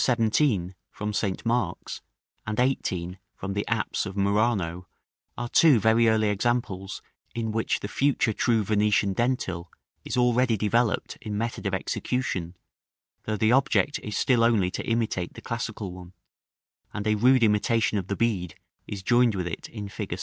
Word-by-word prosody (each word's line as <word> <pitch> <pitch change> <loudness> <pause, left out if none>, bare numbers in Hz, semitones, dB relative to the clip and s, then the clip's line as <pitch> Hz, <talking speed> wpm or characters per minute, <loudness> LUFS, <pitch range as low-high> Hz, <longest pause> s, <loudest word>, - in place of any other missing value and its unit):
17, 110 - +2 0.2
from 105 0 -4
St. 100 0 -2
Mark's, 120 +2 -2 0.5
and 110 +1 -2
18, 95 -8 -1 0.2
from 95 +1 -5
the 100 +1 -2
apse 110 -2 -1
of 95 +1 -7
Murano, 100 -4 0 0.5
are 120 - -3
two 145 -1 +5
very 110 +2 +4
early 110 -1 +2
examples 100 -3 -2 0.3
in 115 -1 -2
which 110 +1 -1
the - - -3
future 135 -1 +1
true 115 -1 +2
Venetian 105 -1 +2
dentil 95 -7 -1 0.4
is - - -4
already 125 -1 +3
developed 110 +2 0
in 105 -2 -4
method 115 -1 -3
of 95 - 0
execution, 95 -5 -2 0.7
though 110 0 -1
the 110 +2 +3
object 140 +2 +2
is 105 - -4
still 120 -3 +3
only 105 -6 +3
to - - -4
imitate 110 -6 -1
the - - -9
classical 110 -4 -4
one; 90 0 -11 0.8
and 105 - -3
a 110 - +3
rude 125 +4 +4
imitation 105 0 +2
of 95 - -6
the 100 - -2
bead 100 -8 -1 0.3
is 100 -2 -6
joined 120 0 +3
with 90 -2 -2
it 85 - -6
in 105 -3 -6
fig. 100 -3 -5
110 Hz, 160 wpm, -26 LUFS, 95-120 Hz, 0.8 s, two